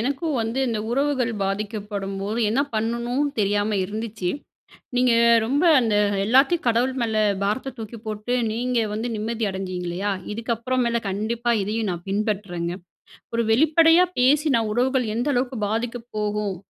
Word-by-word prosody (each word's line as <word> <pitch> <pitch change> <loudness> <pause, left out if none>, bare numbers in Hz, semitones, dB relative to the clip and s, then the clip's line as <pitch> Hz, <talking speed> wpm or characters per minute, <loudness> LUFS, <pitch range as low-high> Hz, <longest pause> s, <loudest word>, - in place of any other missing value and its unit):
எனக்கும் 280 +5 -1
வந்து, 225 +3 -2
இந்த 225 -2 -1
உறவுகள் 265 -2 +1
பாதிக்கப்படும்போது 200 +1 -3
என்ன 255 +6 +2
பண்ணணுன்னு 235 +6 -1
தெரியாம 205 +1 +1
இருந்துச்சு. 215 -2 -4 0.7
நீங்க 250 -1 +4 0.3
ரொம்ப 275 +8 +1 0.2
அந்த 225 -4 +1 0.3
எல்லாத்தையும் 270 +9 +3
கடவுள் 240 +3 +2
மேல, 225 -2 -1 0.3
பாரத்த 235 +6 -2
தூக்கி 225 +1 -7
போட்டு 215 +2 -3 0.2
நீங்க 245 +2 0
வந்து 220 +3 -2
நிம்மதி 220 +1 -2
அடைஞ்சீங்க 185 -2 -4
இல்லையா, 195 +4 -2 0.2
இதுக்கப்புற 235 +3 -2
மேல 235 0 +1
கண்டிப்பா 230 +4 -1
இதயும் 215 +1 -2
நான் 175 -1 -6
பின்பற்றேங்க. 195 -5 -2 0.6
ஒரு 235 - +1
வெளிப்படையா 320 +7 +5 0.2
பேசினா 280 -1 +4
உறவுகள் 255 +1 +1
எந்த 245 +5 0
அளவுக்கு 250 0 -1
பாதிக்கப் 230 +2 -3
போகும் 210 -2 -1
230 Hz, 135 wpm, -23 LUFS, 210-250 Hz, 0.7 s, வெளிப்படையா